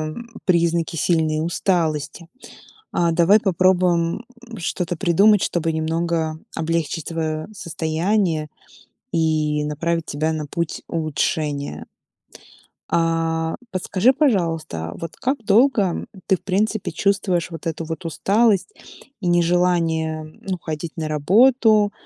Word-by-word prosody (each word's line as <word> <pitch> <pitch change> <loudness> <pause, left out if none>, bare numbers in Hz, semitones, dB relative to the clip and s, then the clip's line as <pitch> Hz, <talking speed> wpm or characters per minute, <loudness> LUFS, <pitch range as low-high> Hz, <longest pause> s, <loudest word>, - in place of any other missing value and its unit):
м, 235 0 -9 0.2
признаки 170 -2 +1
сильной 155 0 +1
усталости. 170 -2 -1 0.7
А 170 -1 +2
давай 180 +6 +5
попробуем, 180 0 +2 0.3
м, 230 - -8
что-то 175 0 -2
придумать, 200 +4 +4
чтобы 165 -1 0
немного 160 0 -1 0.2
облегчить 165 -1 -2
твоё 155 -2 -3
состояние 170 -1 -1 0.6
и 155 -2 +1
направить 165 +2 -1
тебя 155 +2 -1
на 155 -1 -4
путь 170 +2 -3
улучшения. 150 -2 -2 1.1
А, 165 -1 +1 0.2
подскажи, 190 +6 +2
пожалуйста, 165 - 0
вот 165 -1 -6
как 265 +3 -1
долго, 225 +3 +4
м, 185 -3 -2 0.2
ты, 190 - +3
в - - -22
принципе, 200 0 0
чувствуешь 185 -1 0
вот 165 - -8
эту 165 +1 -4
вот 160 +3 -6
усталость 200 - +2 0.5
и 180 - -1
нежелание 170 -2 +1
ну 180 +4 -6
ходить 160 0 -5
на 160 -1 -3
работу, 210 - +4
170 Hz, 115 wpm, -21 LUFS, 160-190 Hz, 1.1 s, давай